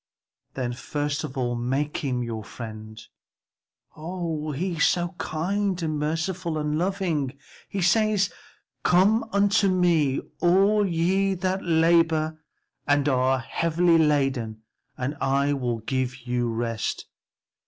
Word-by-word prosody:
"Then 125 -2 -2
first 145 +4 -3
of 140 -3 -6
all 120 -2 0
make 135 +5 -1
him 125 -4 -2
your 115 -2 -4
friend; 110 -1 -9 1.0
oh, 160 -2 -4
he 170 +4 -2
is 155 - +4
so 175 -1 +1
kind 190 +4 -1
and 155 -2 -1
merciful 165 +2 -2
and 150 0 -1
loving. 165 -6 -1 0.3
He 195 -2 -2
says, 210 +1 +2 0.5
'Come 200 +6 +4
unto 200 0 +3
me, 170 -7 +2 0.2
all 195 +4 +4
ye 190 +3 +1
that 185 +1 -1
labor 160 -1 +2 0.5
and 145 -1 +3
are 130 -1 +2
heavy 165 +5 +2
laden, 135 -8 +1 0.3
and 130 +4 -2
I 140 +1 +2
will 125 -4 -1
give 130 +1 -3
you 120 -1 0
rest.' 115 -1 -2
155 Hz, 120 wpm, -25 LUFS, 130-180 Hz, 1.0 s, is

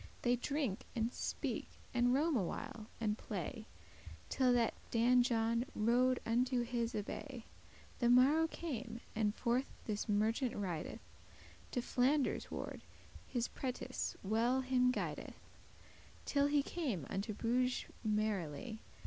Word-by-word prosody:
They 245 0 +4
drink, 260 -4 -1 0.2
and 230 +1 0
speak, - - -2 0.3
and 245 0 +4
roam 300 +4 +3
a 225 - +3
while, 225 +3 -5
and 215 -1 0
play, 215 +3 -4 0.6
Till 255 -2 +3
that 235 -2 +3 0.2
Dan 245 +2 +5
John 230 -1 +2
rode 245 +3 +3
unto 245 +2 +2
his 235 0 -1
abbay. 235 +4 -4 0.6
The 240 - +3
morrow 275 +6 +6
came, 245 -9 -5
and 215 -1 +1
forth 245 +2 +1 0.2
this 210 0 -2
merchant 225 +5 +2
rideth 180 -6 -3 0.7
To 245 - 0
Flanders 265 +3 +2
ward, - - -5 0.5
his 240 -2 0
prentice 255 -2 -3
well 230 +6 +2
him 255 -1 +3
guideth, 250 - -2 0.9
Till 280 0 +3
he 290 -1 +3
came 260 - -2
unto 200 +2 -3
Bruges 250 +3 +1 0.2
merrily. 215 - -1
240 Hz, 125 wpm, -37 LUFS, 220-255 Hz, 0.9 s, morrow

